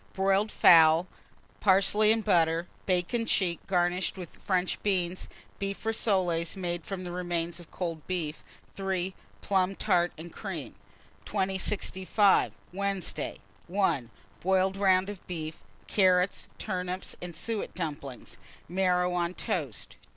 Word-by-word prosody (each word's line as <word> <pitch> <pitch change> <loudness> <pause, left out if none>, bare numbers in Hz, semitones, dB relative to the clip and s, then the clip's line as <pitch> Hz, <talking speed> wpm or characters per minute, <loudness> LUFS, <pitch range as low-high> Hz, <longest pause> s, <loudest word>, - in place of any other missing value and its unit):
Boiled 195 +2 +2
fowls, 165 0 +7 0.5
parsley 205 +2 +4
and 225 -1 +1
butter; 170 -3 +3 0.2
bacon 185 +5 +1
check, 175 -3 +1
garnished 180 0 +1
with 180 -3 -10
French 185 -1 0
beans; 185 -3 0 0.3
beef 200 +2 -3
rissoles, 185 -6 +1
made 175 -2 -2
from 185 0 -5
remains 175 -1 -2
of 170 - -13
cold 165 -4 -5
beef. 165 -5 -2 0.3
3. 190 -1 -2 0.3
Plum 190 -1 +1
tart 175 -1 +2
and 165 +2 -9
cream. 165 - -6 0.5
2065. 195 0 +2 0.2
Wednesday. 195 -1 -3 0.3
1. 175 - +1 0.3
Boiled 190 +1 +2
round 190 -1 +3
of 205 -3 -8
beef, 160 -3 -5 0.2
carrots, 185 -1 +2
turnips, 185 -2 -4
and 175 -2 -6
suet 220 +5 -4
dumplings; 145 -6 -6 0.3
marrow 180 0 +1
on 175 0 -1
toast. 155 - -3
185 Hz, 115 wpm, -29 LUFS, 175-195 Hz, 0.5 s, fowls